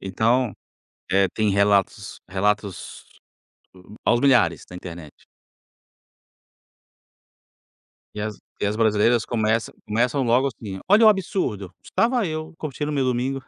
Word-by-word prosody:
então, 110 +5 +1 0.6
eh, 95 0 +4
tem 110 -1 +1
relatos 100 -1 +1
relatos 100 0 -2 1.0
aos 120 0 +3
milhares 125 -12 +3
da 90 - -10
internet. 85 -4 -10 2.9
E 105 - -5
as 105 -1 -4 0.2
e - - +1
as 105 - -1
brasileiras 110 +1 +2
começa 110 -1 0
começam 120 +6 0
logo 125 +3 +2
assim: 100 -6 -8
"Olha 215 +3 +6
o - - +10
absurdo, 170 - -1
estava 235 -2 +1
eu, 155 0 -5
curtindo 150 0 -4
meu 140 -2 0
domingo". 130 +1 -1
115 Hz, 115 wpm, -23 LUFS, 100-135 Hz, 2.9 s, o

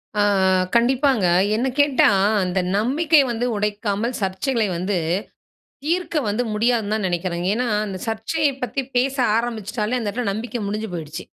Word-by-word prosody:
அ 210 - +2 0.5
கண்டிப்பாங்க. 255 -2 +3 0.3
என்ன 240 +4 0
கேட்டா, 285 -2 +5 0.3
அந்த 180 +1 -1 0.2
நம்பிக்கை 295 +7 +3
வந்து 235 +1 -2
உடைக்காமல் 210 +3 -2
சர்ச்சைகளை 210 +5 0
வந்து, 185 +2 -1 0.9
தீர்க்க 340 +1 -1
வந்து 215 +4 0
முடியாதுனு 220 -1 +1
தான் 215 -3 -1
நினைக்கிறேங்க. 175 0 -2
ஏனா 250 +3 -1 0.2
அந்த 190 -2 -5
சர்ச்சையை 280 +7 0
பத்தி 270 +2 -2
பேச 265 +2 +1 0.2
ஆரம்பிச்சுட்டாலே, 230 0 -2
அந்த 220 - -3
இடத்தில 235 -1 -2
நம்பிக்கை 230 +3 -4
முடிஞ்சு 215 +1 -3
போயிடுச்சு. 155 -2 -6
225 Hz, 135 wpm, -21 LUFS, 205-255 Hz, 0.9 s, கேட்டா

